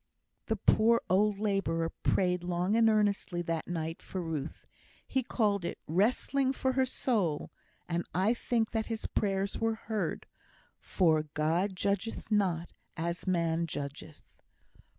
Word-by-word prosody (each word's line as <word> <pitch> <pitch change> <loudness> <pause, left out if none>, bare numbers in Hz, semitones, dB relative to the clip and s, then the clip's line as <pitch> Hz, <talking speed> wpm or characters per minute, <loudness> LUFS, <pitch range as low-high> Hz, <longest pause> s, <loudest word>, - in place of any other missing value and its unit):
The 220 - +1
poor 225 +3 +4
old 205 +2 +3
labourer 195 -6 0
prayed 180 -2 +1
long 180 +3 0
and 225 -1 +5
earnestly 205 -4 +1
that 165 -1 -2
night 165 -1 -3
for 190 - -5
Ruth. 160 -4 -4 0.4
He 265 - +1
called 210 -5 0
it - - -3
"wrestling 255 - +2
for 260 0 0
her 260 0 +2
soul;" 200 - 0 0.4
and 170 0 -1
I 190 +6 +2
think 230 -2 0
his 225 -1 -2
prayers 195 -1 -1
were 225 0 +1
heard, 220 -1 -3 0.5
for 160 -4 +2
"God 170 +6 +1
judgeth 200 +4 -2
not 180 -5 +1 0.2
as 170 +3 -3
man 170 -2 +1
judgeth." 145 +1 -7
195 Hz, 130 wpm, -31 LUFS, 170-220 Hz, 0.5 s, and